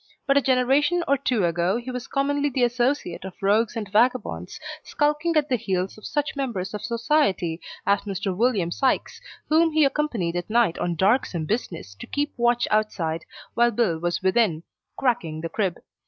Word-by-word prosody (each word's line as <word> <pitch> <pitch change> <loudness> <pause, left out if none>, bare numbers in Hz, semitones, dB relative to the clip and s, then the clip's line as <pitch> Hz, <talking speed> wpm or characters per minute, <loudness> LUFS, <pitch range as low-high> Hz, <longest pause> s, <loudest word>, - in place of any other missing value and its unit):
But 275 - +3
a 280 - +5
generation 275 +7 +2
or 280 - +4
two 250 -7 0
ago 175 +4 +1
he 245 +2 -6
was 250 -1 -5
commonly 285 +1 0
the 255 -2 0
associate 245 -6 0
of 190 -1 -8
rogues 210 +4 +2
and 220 -3 -3
vagabonds, 215 - +1 0.2
skulking 300 +3 0
at 300 -1 +2
the 255 - +1
heels 190 -4 -2
of 215 - -9
such 295 -1 -2
members 225 -9 -3
of 210 - -4
society 230 - 0 0.2
as 200 0 +3
Mr. 195 -2 -3
William 205 -6 +1
Sikes, 265 +8 0 0.3
whom 325 +1 +4
he 310 -1 +5
accompanied 240 - -1
at 175 +2 -4
night 230 -6 +2
on 175 -1 -1
darksome 190 -3 +1
business 165 - -3
to - - -8
keep 290 +1 -2
watch 240 0 +2
outside 175 -7 0 0.3
while 240 0 +4
Bill 210 -8 0
was 175 +2 -2
within, 190 -4 +2 0.3
cracking 190 -12 -1
the 165 - -4
crib. 185 -1 -1
230 Hz, 175 wpm, -24 LUFS, 180-270 Hz, 0.3 s, a